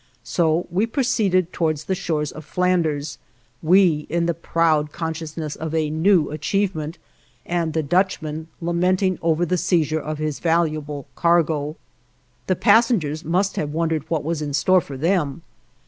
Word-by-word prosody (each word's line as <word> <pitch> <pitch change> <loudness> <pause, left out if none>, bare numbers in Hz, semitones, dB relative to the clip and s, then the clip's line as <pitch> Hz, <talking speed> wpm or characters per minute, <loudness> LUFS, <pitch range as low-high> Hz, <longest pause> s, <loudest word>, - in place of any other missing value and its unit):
So 165 +4 +1
we 195 +6 +1
proceeded 210 - +1
towards 155 -3 -1
the 190 - -2
shores 160 -5 -2
of 155 - -10
Flanders; 155 -6 0 0.4
we, 165 -3 +4
in 170 +1 0
the 170 - +1
proud 160 -2 +1
consciousness 160 -1 -5
of 160 0 -4
a 155 -2 0
new 160 0 +3
achievement, 165 0 -2 0.5
and 170 -2 -1
the 160 0 0
Dutchman 160 -2 0
lamenting 180 +2 +1
over 165 +1 +1
the 180 +1 0
seizure 160 -3 +1
of 155 +1 -4
his 155 -1 -3
valuable 155 -4 0
cargo. 160 -3 +1 0.7
The 185 - +2
passengers 175 - +3
must 185 +5 0
have 150 -1 -2
wondered 160 -1 -1
what 160 -3 -1
was 160 0 -2
in 145 -2 -2
store 185 +4 +4
for 140 -3 -8
them. 160 -1 0
165 Hz, 145 wpm, -22 LUFS, 155-180 Hz, 0.7 s, we